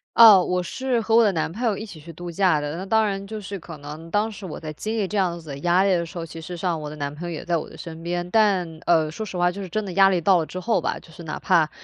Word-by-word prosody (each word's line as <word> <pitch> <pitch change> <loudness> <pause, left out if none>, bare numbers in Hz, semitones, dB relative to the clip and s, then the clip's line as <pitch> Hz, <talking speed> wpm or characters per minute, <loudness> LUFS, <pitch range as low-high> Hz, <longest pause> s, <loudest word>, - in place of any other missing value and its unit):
哦， 210 -6 +9
我 180 0 0
是 255 +5 -1
和 225 0 +1
我 230 - +7
的 205 - +4
男 160 -2 -1
朋 220 +8 -6
友 220 -5 +1
一 220 - -5
起 180 -7 -11
去 165 +3 -10
度 175 +2 -7
假 180 -3 +3
的， 145 +1 -4
那 190 - -5
当 220 +1 +3
然 195 -1 -2
就 215 +1 -5
是 200 -1 -6
可 165 -1 -10
能 150 +3 -9
当 210 +2 +1
时 205 -2 -10
我 175 - -6
在 155 -1 -6
经 215 +8 -4
历 205 -3 0
这 210 - -6
样 175 -3 +1
子 160 -3 -13
的 140 - -5
压 175 +4 +3
力 195 - +3
的 175 -2 +2
时 170 - -10
候， 165 - -3
其 165 0 -9
实 175 +2 -7
上 170 -3 -1
我 150 - -5
的 150 - -8
男 145 -1 -3
朋 175 +3 -6
友 - - -3
也 155 - -6
在 175 0 +1
我 160 - -3
的 - - -13
身 165 -2 -8
边。 175 +1 -2
但， 185 -7 +2
呃， 160 -2 +4
说 220 - -5
实 190 -3 -6
话 175 0 +3
就 200 +2 -7
是 190 - -6
真 215 +4 -2
的 185 - -5
压 195 +1 +6
力 185 -2 +2
到 180 +2 +4
了 160 - -1
之 185 - -6
后 225 +5 +1
吧， - - -1
就 165 - -17
是 165 - -12
哪 155 - -5
怕 170 -5 +3
180 Hz, 360 characters per minute, -24 LUFS, 165-200 Hz, -, 哦